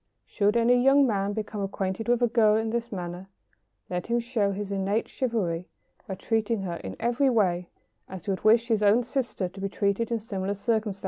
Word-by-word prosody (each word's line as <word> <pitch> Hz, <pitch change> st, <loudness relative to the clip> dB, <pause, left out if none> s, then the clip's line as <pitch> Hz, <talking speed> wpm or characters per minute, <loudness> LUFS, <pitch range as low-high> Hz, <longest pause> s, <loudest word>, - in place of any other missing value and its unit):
Should 210 Hz, +2 st, +1 dB
any 245 Hz, +1 st, +4 dB
young 275 Hz, +1 st, +6 dB
man 200 Hz, -4 st, 0 dB
become 210 Hz, -1 st, -4 dB
acquainted 195 Hz, +2 st, -3 dB
with 245 Hz, 0 st, +2 dB
a -, -, +5 dB
girl 220 Hz, -2 st, +4 dB
in 220 Hz, 0 st, 0 dB
this 235 Hz, 0 st, -3 dB
manner, 180 Hz, -1 st, -6 dB, 0.6 s
let 180 Hz, -1 st, -4 dB
him 235 Hz, +1 st, +1 dB
show 230 Hz, -4 st, 0 dB
his 200 Hz, 0 st, -5 dB
innate 200 Hz, +3 st, 0 dB
chivalry 185 Hz, -9 st, -2 dB, 0.4 s
by 190 Hz, -, -4 dB
treating 225 Hz, +2 st, -1 dB
her 175 Hz, -2 st, -3 dB
in 95 Hz, -, -7 dB
every 245 Hz, +3 st, +2 dB
way 180 Hz, -7 st, +1 dB, 0.4 s
as 190 Hz, -3 st, -8 dB
he 200 Hz, -, -1 dB
would 190 Hz, -, -3 dB
wish 230 Hz, +2 st, +5 dB
his 220 Hz, -3 st, +1 dB
own 210 Hz, +4 st, +4 dB
sister 235 Hz, -6 st, -2 dB
to 190 Hz, +2 st, -11 dB
be 195 Hz, -, -2 dB
treated 200 Hz, +3 st, 0 dB
in 235 Hz, -, 0 dB
similar 200 Hz, -2 st, -3 dB
circumstances. 215 Hz, -1 st, -1 dB
210 Hz, 200 wpm, -27 LUFS, 195-235 Hz, 0.6 s, young